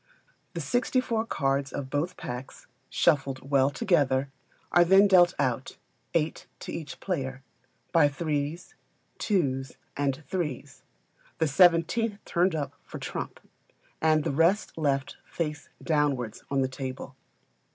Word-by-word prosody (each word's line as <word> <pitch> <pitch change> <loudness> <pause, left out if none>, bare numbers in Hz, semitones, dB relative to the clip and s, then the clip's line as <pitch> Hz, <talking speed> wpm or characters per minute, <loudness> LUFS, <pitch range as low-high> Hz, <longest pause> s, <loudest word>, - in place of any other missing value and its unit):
The 170 - -2
sixty 245 - +1
four 230 -3 -1
cards 135 -3 0
of 135 -2 -5
both 150 +5 -1
packs, 125 +2 -7 0.2
shuffled 135 -1 +1
well 135 -1 +4
together, 140 -4 +1 0.4
are 175 - +6
then 195 +3 +6
dealt 180 -2 +6
out, 130 -1 -1 0.4
eight 160 -1 0
to - - -6
each 160 -3 -6
player, 135 -8 -3 0.5
by 165 -4 +5
threes, 150 +2 -3 0.5
twos, 135 - 0 0.2
and 140 +1 -1
threes; 155 -7 -4 0.6
the 160 - +2
seventeenth 180 - +4
turned 175 0 +2
up 145 -2 -3
for - - -8
trump, - - -5 0.6
and 155 -1 +3
the - - -1
rest 170 +8 +2
left, 140 -3 -1
face 150 -2 -4
downwards, 145 -8 0
on 140 -1 +1
the - - +1
table. 130 0 -6
150 Hz, 130 wpm, -28 LUFS, 135-175 Hz, 0.6 s, are